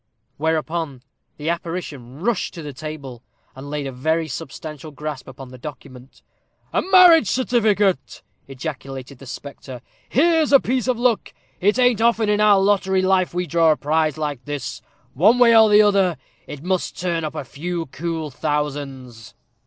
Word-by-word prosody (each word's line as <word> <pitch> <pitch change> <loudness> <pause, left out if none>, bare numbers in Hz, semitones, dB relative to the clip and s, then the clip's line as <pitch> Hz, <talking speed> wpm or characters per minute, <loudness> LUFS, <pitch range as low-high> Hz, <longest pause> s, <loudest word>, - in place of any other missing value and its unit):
Whereupon 160 -3 -2 0.3
the 150 +2 -3
apparition 160 -6 -6
rushed 220 0 -1
to 165 - -7
the 145 -1 -7
table, 140 -4 -8 0.3
and 135 +2 -9
laid 145 -1 -3
a 135 - -4
very 160 +6 -1
substantial 150 +2 -7
grasp 150 -1 -7
upon 130 0 -10
the 130 0 -12
document. 130 -2 -11 0.5
"A - - +2
marriage 360 - +7
certificate!" 210 - +1 0.2
ejaculated 135 -1 -7
the 135 - -12
spectre; 135 -1 -9 0.3
"here's 320 +2 +3
a 275 - +8
piece 255 -1 -1
of 255 -2 +1
luck! 240 -2 0 0.2
It 205 +5 +2
ain't 245 -3 +3
often 230 -2 +2
in 210 0 +2
our 205 -2 +6
lottery 190 -1 +2
life 185 -2 +1
we 180 0 0
draw 165 0 +3
a - - -7
prize 155 0 0
like 145 -5 -4
this. 145 -3 -5 0.3
One 210 - +4
way 235 -2 +6
or 220 -1 +7
the 210 +1 +7
other, 195 -5 +2 0.3
it 145 0 -8
must 185 0 -2
turn 170 -2 -1
up 155 0 -4
a 150 - -5
few 170 +5 -4
cool 160 +1 -4
thousands." 135 -5 -4
160 Hz, 160 wpm, -21 LUFS, 140-205 Hz, 0.5 s, a